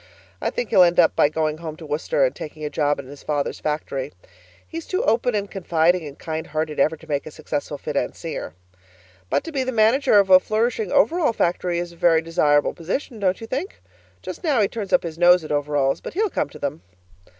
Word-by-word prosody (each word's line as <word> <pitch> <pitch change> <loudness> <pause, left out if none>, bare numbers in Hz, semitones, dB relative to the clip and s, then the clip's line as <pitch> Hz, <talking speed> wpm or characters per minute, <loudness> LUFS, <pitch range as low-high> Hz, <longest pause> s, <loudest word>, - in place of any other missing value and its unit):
I - - 0
think 245 - -4
he'll 185 - +6
end 175 0 +5
up 165 - +5
by 145 - +4
going 155 0 -1
home 160 -2 -6
to 165 - -10
Worcester 165 - +1
and - - -2
taking 155 0 -7
a 150 - -4
job 145 -1 +1
in 140 - -7
his 140 +2 -12
father's 145 -2 -2
factory. 150 -3 -3 0.6
He's 330 0 -7
too 375 +5 -1
open 240 - +1
and 200 -1 -2
confiding 170 -2 +1
and 140 - -10
kind 160 0 -5
hearted 155 0 -3
ever 160 +3 +2
to - - -16
make 145 -1 -2
a - - -5
successful 145 -1 -4
financier. 150 - -4 0.7
But - - +1
to 330 - -7
be 275 -3 -1
the 260 - -2
manager 225 +1 +4
of 195 -1 +4
a 185 - +10
flourishing 220 -1 -1
overall 315 - +3
factory 175 -2 0
is 175 0 -3
a - - -15
very 165 -1 +3
desirable 145 -3 +2
position, 215 - -4
don't 185 -2 +1
you 225 - -7
think? 280 - -4 0.4
Just - - -7
now 295 -7 +2
he 205 - +4
turns 210 -2 -6
up 270 - +4
his 165 -1 -6
nose 175 0 +6
at 155 - -7
overalls, 145 -2 0
but - - -8
he'll 420 0 +1
come - - -1
to - - -12
them. 140 -12 -4
170 Hz, 220 wpm, -22 LUFS, 150-220 Hz, 0.7 s, a